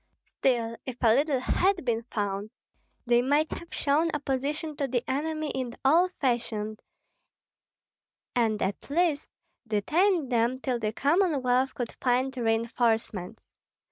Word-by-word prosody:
Still, 235 -3 0
if 250 -2 -5
a 225 -2 +6
leader 280 +1 +2
had 365 +6 +1
been 230 -2 +1
found, 205 0 -2 0.6
they 240 0 +4
might 290 +5 +2
have 340 - -7
shown 300 +4 +1
opposition 290 +2 -2
to 280 - -1
the 245 -2 -1
enemy 310 +2 -2
in 255 -2 -4
old 340 +6 +5
fashion, 220 -4 -1 1.6
and 225 -3 +2
at 195 +7 -3
least 310 -1 +1 0.4
detained 305 - +1
them 240 +2 +1
till 255 -2 -1
the 215 -1 -1
Commonwealth 270 - +2
could 245 -2 -3
find 255 +1 +1
reinforcements. 225 -4 -1
255 Hz, 125 wpm, -28 LUFS, 230-295 Hz, 1.6 s, a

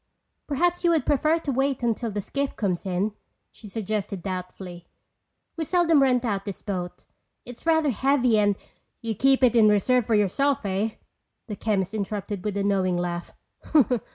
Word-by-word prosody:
"Perhaps 350 +5 0
you 345 - +4
would 325 -3 +2
prefer 305 +3 +2
to 315 -4 -3
wait 270 0 0
until 230 0 0
the 205 -1 -3
skiff 280 +7 -3
comes 190 -3 -2
in," 190 +4 0 0.4
she 215 - -13
suggested 205 -2 -3
doubtfully. 180 -1 -6 0.7
"We 330 - -2
seldom 335 -3 +3
rent 250 -2 +3
out 200 -4 -1
this 200 -2 -7
boat. 180 -4 -5 0.4
It's 245 +6 -10
rather 320 -3 +3
heavy 250 -2 +2
and—" 205 -1 +3 0.5
"You 230 -1 -2
keep 270 +5 +3
it 245 -2 +5
in 220 -2 +6
reserve 225 +3 +2
for 225 - +3
yourself, 225 +6 +1
eh?" 200 +3 -1 0.5
the 210 - -6
chemist 195 -2 -1
interrupted 205 -2 -4
with 205 -1 -2
a 200 - 0
knowing 190 -3 +1
laugh. 175 0 -3
215 Hz, 165 wpm, -25 LUFS, 195-270 Hz, 0.7 s, in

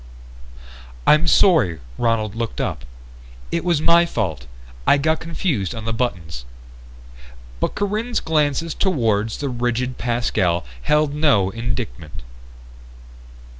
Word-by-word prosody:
"I'm 155 +3 +5
sorry." 155 - +4 0.2
Ronald 115 -3 +1
looked 115 -1 -4
up. 65 - -3 0.7
"It 170 - -1
was 170 -4 +1
my 170 0 +5
fault. 85 - -3 0.4
I - - +6
got 155 +3 +1
confused 160 - -2
on 110 -1 -6
the 115 - -1
buttons." 90 - -3 1.2
But - - -1
Corinne's 215 +4 -1
glances 155 0 0
toward 115 - +1
the 140 +5 -3
rigid 125 +1 -2
Pascal 110 - 0 0.2
held 150 - +2
no 140 -11 +3
indictment. 80 - -5
120 Hz, 110 wpm, -21 LUFS, 100-160 Hz, 1.2 s, I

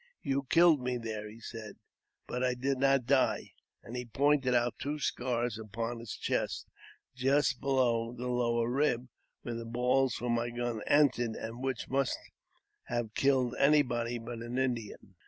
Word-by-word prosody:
" - - -45
You 135 0 -1
killed 165 -4 +6
me 125 0 -1
there," 110 -2 -5
he 110 +2 -12
said, 110 -2 -8 0.5
"but 125 +1 -3
I 125 -1 +1
did. 135 +1 -1
not 135 -2 +3
die; 135 +1 +2 0.2
" - - -50
and 115 - -8
he 125 - -2
pointed 135 +1 +2
out 120 0 +1
two 145 +2 -2
scars 120 -4 -1
upon 115 +2 -4
his 115 -2 -6
chest, - - -1 0.5
just 135 0 +2
below 125 -4 +2
the 125 +1 -6
lower 120 -1 +1
rib, 125 -1 +1 0.3
where 120 - -4
the 115 0 -4
balls 125 +2 +1
from 120 +2 -2
my 120 0 0
gun 120 -2 -3
entered, 125 -6 +3
and 115 +2 -6
which 130 -3 -2
must 135 0 0 0.7
have 120 -3 -3
killed 130 -2 +2
anybody 125 -5 +3
but 115 0 -7
an 120 +2 -5
Indian. 120 -5 -2
125 Hz, 170 wpm, -31 LUFS, 115-135 Hz, 0.7 s, killed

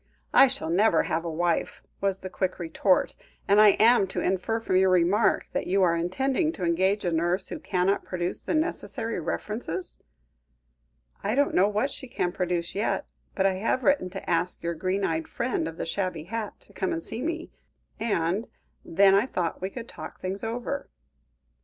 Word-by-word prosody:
"I 270 - +8
shall 165 -11 -3
never 185 -1 +4
have 160 +1 -1
a 170 - -3
wife," 170 +1 -1 0.2
was 195 -1 0
the 185 - -6
quick 185 0 -1
retort, 180 +2 +1 0.3
"and 200 +1 +5
am 215 +3 +6
I - - +2
to 190 - -4
infer 190 +5 0
from 190 -5 +1
your 190 0 +4
remark 185 +4 +3
that - - -2
you 195 +1 +3
are 170 -2 +3
intending 265 - 0
to 185 - -6
engage 190 +4 +1
a 175 - +1
nurse 175 +3 0
who - - -5
cannot 185 +1 0
produce 175 -1 -2
the - - -2
necessary 310 - -2
references?" 185 0 -4 1.2
"I 210 +4 0
don't 285 +1 +2
know 190 +3 +4
what 215 +7 0
she 265 - -6
can 205 -7 -1
produce 175 -2 -2
yet, 205 +3 -1 0.2
but 190 - +1
I 195 - +4
have 230 +5 0
written 280 -10 +2
to 195 +1 -8
ask 175 +1 0
your 170 0 -1
green 185 +4 -1
eyed 160 0 -1
friend 235 -9 -2
of 165 0 -7
the - - -3
shabby 170 -2 -2
hat, 215 +4 -5
to 200 - -18
come 190 0 -2
and 165 - -3
see 225 +2 -5
me, 330 +3 -3 0.5
and 200 -1 0 0.4
then 195 +3 +4
I 200 +5 +4
thought 175 -8 -2
we 190 - -2
could 235 +3 -8
talk - - -8
things 190 +3 -4
over." 245 +5 -3
190 Hz, 190 wpm, -27 LUFS, 175-225 Hz, 1.2 s, I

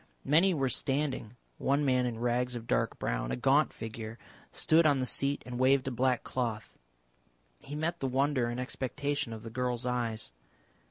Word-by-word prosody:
Many 170 +6 +4
were 135 -3 +1
standing, 135 -3 -1 0.2
one 140 +2 +2
man 125 -2 +3
in 115 -2 -3
rags 120 +1 0
of 115 -1 -6
dark - - 0
brown, - - -2
a - - 0
gaunt 60 - +3
figure, 110 0 -7 0.3
stood 160 0 +4
on 145 -2 +4
the 130 - 0
seat 140 +2 0
and 125 0 -5
waved 130 +1 +4
a - - 0
black 125 0 +1
cloth. 115 -5 -3 0.8
He 145 - -8
met 165 +3 -1
the 135 - -1
wonder 130 -1 +1
and 120 +1 -3
expectation 135 +1 -2
of 110 -1 -7
the 115 - -7
girl's 125 0 -2
eyes. 115 - -2
125 Hz, 175 wpm, -31 LUFS, 120-140 Hz, 0.8 s, Many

